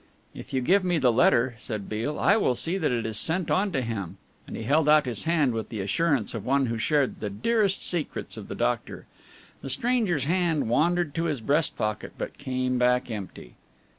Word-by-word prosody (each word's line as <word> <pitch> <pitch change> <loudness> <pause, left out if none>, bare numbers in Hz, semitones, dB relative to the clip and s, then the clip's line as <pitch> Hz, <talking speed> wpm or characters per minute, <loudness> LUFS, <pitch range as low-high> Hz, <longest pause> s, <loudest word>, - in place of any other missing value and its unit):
"If - - -10
you 130 - 0
give 185 +9 +3
me 180 -2 +1
the 130 -5 +3
letter," 120 +1 +3
said 105 -3 -5
Beale, 115 +8 -3
"I 200 - +4
will 200 - +2
see 175 +9 0
that 155 - +1
it 120 -2 -1
is 110 -1 -2
sent 170 +1 -1
on 195 +1 +2
to 140 -6 0
him," 105 -7 -5 0.3
and - - -6
he - - -5
held 150 +6 +2
out 150 -1 +6
his 120 -5 -3
hand 155 -6 +2
with 110 -1 -4
the 110 - -5
assurance 130 - 0
of 115 -4 -5
one 135 +1 +2
who 115 -2 -3
shared 145 +2 +1
the 105 - -3
dearest 195 - 0
secrets 170 -4 -3
of - - -8
the - - -6
doctor. - - -2 0.6
The - - -6
stranger's 200 - 0
hand 165 -3 +1
wandered 165 +5 +1
to 165 +2 -1
his 150 -5 -1
breast 145 +7 0
pocket, 105 -1 -3
but - - -6
came 130 -2 -1
back 125 0 +2
empty. 95 - -7
135 Hz, 210 wpm, -26 LUFS, 115-170 Hz, 0.6 s, out